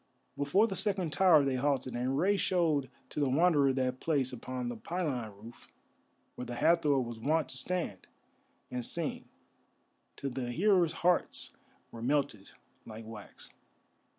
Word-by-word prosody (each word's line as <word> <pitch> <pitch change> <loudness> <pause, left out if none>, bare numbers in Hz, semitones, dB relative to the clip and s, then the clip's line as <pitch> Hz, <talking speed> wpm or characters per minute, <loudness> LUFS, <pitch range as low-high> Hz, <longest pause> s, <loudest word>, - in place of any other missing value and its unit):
Before 145 +10 +3
the 200 -4 -3
second 190 -6 -1
tower 165 -6 +5
they 135 -1 0
halted, 130 -2 0
and 130 +3 -1
Rei 195 +6 +3
showed 160 -9 +1 0.2
to - - -5
the 140 -2 +2
Wanderer 145 -1 +4
that 130 -1 -1
place 140 -6 0
upon 125 +1 -5
the 120 - -3
pylon 135 -5 -3
roof 115 +3 -13 0.7
where 125 - -7
the 120 - -5
Hathor 150 0 +3
was 120 -2 -4
wont 155 +5 +1
to 130 - -4
stand 165 - -3 0.6
and 125 -1 -3
sing 165 +5 -2 0.9
till 140 - -4
the 125 -1 -3
hearers' 180 - +3
hearts 180 -1 +1 0.4
were 115 - -9
melted 135 -5 -1 0.3
like 110 0 -9
wax. 110 -2 -11
140 Hz, 150 wpm, -31 LUFS, 125-170 Hz, 0.9 s, tower